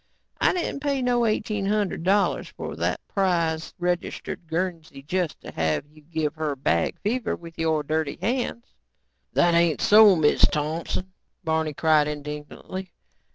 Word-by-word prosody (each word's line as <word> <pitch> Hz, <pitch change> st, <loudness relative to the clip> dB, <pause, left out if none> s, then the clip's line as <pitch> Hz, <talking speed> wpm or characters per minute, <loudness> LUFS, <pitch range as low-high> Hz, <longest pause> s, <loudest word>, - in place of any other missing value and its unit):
I -, -, +4 dB
didn't 350 Hz, -5 st, -2 dB
pay 280 Hz, -2 st, 0 dB
no 240 Hz, -1 st, +2 dB
eighteen 215 Hz, -2 st, -1 dB
hundred 205 Hz, -5 st, 0 dB
dollars 195 Hz, +4 st, +2 dB
for -, -, -7 dB
that -, -, -2 dB
prize, 170 Hz, -4 st, 0 dB
registered 175 Hz, -1 st, -3 dB
Guernsey 165 Hz, -4 st, -3 dB
just 175 Hz, +1 st, -2 dB
to -, -, -9 dB
have 80 Hz, -, 0 dB
you 155 Hz, 0 st, -18 dB
give 155 Hz, -1 st, -2 dB
her 155 Hz, -2 st, -1 dB
bag 85 Hz, -11 st, 0 dB
fever 230 Hz, +3 st, -1 dB
with 165 Hz, -1 st, -12 dB
your 160 Hz, -2 st, +1 dB
dirty 155 Hz, -1 st, -1 dB
hands." 225 Hz, -, -1 dB, 0.7 s
"That 175 Hz, 0 st, +4 dB
ain't 170 Hz, -2 st, +3 dB
so, 210 Hz, -2 st, +7 dB
Miz 155 Hz, -3 st, +3 dB
Thompson," 160 Hz, +5 st, 0 dB, 0.3 s
Barney 160 Hz, -2 st, 0 dB
cried 155 Hz, -1 st, +4 dB
indignantly. 150 Hz, +5 st, -6 dB
165 Hz, 145 wpm, -25 LUFS, 155-195 Hz, 0.7 s, so